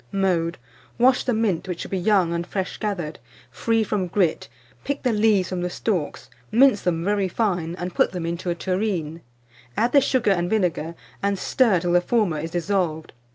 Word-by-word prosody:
Mode. 180 -4 0 0.4
Wash 250 +2 +4
the 255 - +1
mint, 215 -7 0
which 180 -2 -4
should - - -7
be 190 - 0
young 180 -3 +2
and 170 +1 -3
fresh 190 -1 -3
gathered, 180 -7 -3 0.3
free 225 -1 +1
from 200 -3 -1
grit; 175 -2 0 0.3
pick 280 0 -3
the 250 -3 +2
leaves 210 -3 +3
from 185 -1 -3
the 180 - -1
stalks, 175 -5 -2 0.2
mince 250 -3 +5
them 170 -1 -1
very 200 -1 +1
fine, 180 -5 -1
and 180 0 -5
put - - +2
them 180 -3 -4
into 170 +2 -3
a 170 - 0
tureen; 180 -4 -2 0.6
add 235 +2 +2
the 280 - +6
sugar 250 -5 +2
and 175 -2 +1
vinegar, 175 -6 0 0.3
and 200 0 0
stir 215 -1 +2
till 175 - -1
the 175 0 +4
former 190 -6 +1
is 165 +2 -4
dissolved. 175 -2 -1
185 Hz, 190 wpm, -23 LUFS, 170-215 Hz, 0.6 s, the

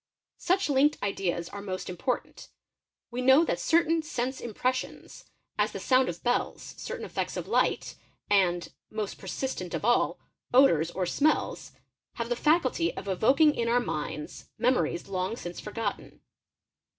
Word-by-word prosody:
Such 375 +2 +1
linked 290 +1 +3
ideas 185 -4 -1
are 200 - -7
most 185 -2 -5
important: 185 +8 -3 0.6
we 245 +1 -3
know 265 +6 +6
that - - -1
certain 330 0 +3
sense 260 -3 -3
impressions, 255 +3 -3 0.3
as - - +2
the - - -4
sound 255 0 +3
of 170 - -7
bells, 245 0 -1
certain - - -5
effects - - -3
of - - -3
ght, - - 0 0.3
and—most 195 +2 -1
persistent 190 -2 -4
of - - -3
all—odours 240 - +2
or 180 +1 -2
smells, 295 - 0 0.4
have 235 0 -4
the 240 - +1
faculty 330 +4 +2
of 200 - -6
evoking 265 - +4
in 235 -3 -1
our 240 +1 +3
minds 150 -8 -5
memories 245 -9 +1
long 190 +2 -2
since 175 -6 -7
forgotten. 210 -1 -5
235 Hz, 140 wpm, -28 LUFS, 185-265 Hz, 0.6 s, know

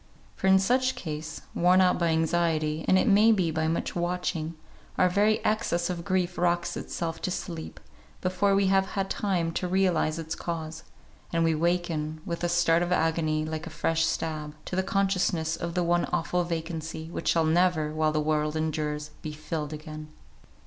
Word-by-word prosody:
For 190 - -1
in 190 0 +7
such 255 +7 +2
case, 155 -1 -6
worn 180 +2 +4
out 185 -1 +4
by 170 - +2
anxiety, 160 -1 +1
and 185 - +5
it 190 - +2
may 215 +2 +6
be 185 -6 +2
by 160 0 0
much 165 - -2
watching, 175 -2 -2 0.4
our 185 - +5
very 205 +4 +3
excess 180 -5 +1
of 170 -1 -5
grief 185 -1 -1
rocks 175 0 +1
itself 165 -1 -4
to - - -1
sleep, 170 -3 -5 0.4
before 185 +2 +1
we 200 0 +3
have 190 0 +3
had 195 0 -1
time 180 -5 0
to 180 - -2
realise 180 -4 +1
its 160 -1 -4
cause; 160 -2 -5 0.5
and 165 -1 +1
we 165 0 +3
waken, 160 -2 -1
with 170 -2 -4
a 175 - +1
start 170 -1 +3
of 175 0 -1
agony 160 -2 +1
like 160 +1 -4
a - - -5
fresh 160 +1 0
stab, 155 -2 -2
to - - -4
the 190 - +2
consciousness 185 -4 0
of 170 0 -5
the 180 - +2
one 175 0 +2
awful 175 +2 0
vacancy, 160 -1 -4
which - - -5
shall 165 -1 +3
never, 160 -2 +2
while 155 0 +1
the 155 - 0
world 150 0 0
endures, 150 -1 -2
be 155 - -5
filled 150 0 -4
again. 155 0 -7
170 Hz, 185 wpm, -27 LUFS, 155-180 Hz, 0.5 s, in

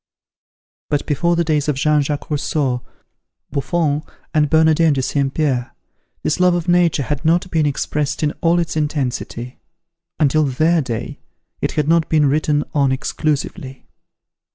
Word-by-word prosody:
But 145 - 0
before 170 +4 +1
the 170 - +2
days 150 -3 0
of 150 - +1
Jean 150 +2 +2
Jacques 145 +2 -4
Rousseau, 140 -4 -1 0.7
Buffon, 150 +1 0 0.3
and 150 -2 +2
Bernardin 160 0 +4
de 135 - 0
St. 140 0 0
Pierre, 135 -5 -1 0.5
this 155 - 0
love 180 -1 +4
of 175 -1 -3
Nature 175 -4 +3
had 145 +2 -3
not 170 +3 +1
been 155 -3 +2
expressed 145 +1 -2
in 150 - +2
all 170 +1 +3
its 170 -3 -1
intensity. 130 -5 -3 0.6
Until 155 0 +3
their 155 +5 +2
day, 120 -5 -5 0.4
it - - -1
had 150 -2 0
not 165 0 +2
been 155 -2 +3
written 150 +1 +1
on 140 -3 +2
exclusively. 140 -1 -3
150 Hz, 150 wpm, -19 LUFS, 140-160 Hz, 0.7 s, Bernardin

